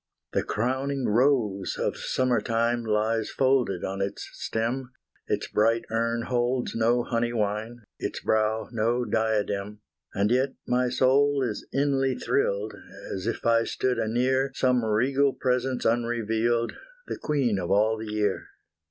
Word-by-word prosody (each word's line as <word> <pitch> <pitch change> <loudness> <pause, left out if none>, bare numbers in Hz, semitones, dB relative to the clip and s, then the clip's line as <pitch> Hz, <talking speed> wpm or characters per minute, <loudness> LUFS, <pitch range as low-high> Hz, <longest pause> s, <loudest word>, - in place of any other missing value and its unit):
The - - +2
crowning 130 +4 -1
rose 110 -5 +2
of - - -1
summer 130 -2 0
time 115 +1 0
Lies 110 0 0
folded 130 -9 +1
on 95 +1 -3
its 100 0 -3
stem, 125 +3 -3 0.3
Its - - -1
bright 115 +2 +2
urn 115 +1 0
holds 125 +1 0
no 120 +2 +2
honey 120 0 -1
wine, 110 +2 -2 0.2
Its - - -3
brow 110 0 +1
no 120 +2 0
diadem, 105 -2 -1 0.3
And 100 +3 +1
yet 130 +2 +1
my 125 0 +2
soul 135 +3 +3
is 110 -4 -3
inly 135 -2 +1
thrilled, 105 -5 0 0.4
As 95 +2 -4
if 115 - -3
I 115 0 +4
stood 125 +2 -1
anear 130 +4 +1
Some 125 -1 +2
legal 130 +6 +2
presence 125 0 -1
unrevealed, 115 0 +1 0.3
The - - -5
queen 130 -9 0
of 85 - -3
all 105 +3 +3
the 110 -1 -6
year. 105 -2 0
115 Hz, 140 wpm, -26 LUFS, 110-130 Hz, 0.4 s, I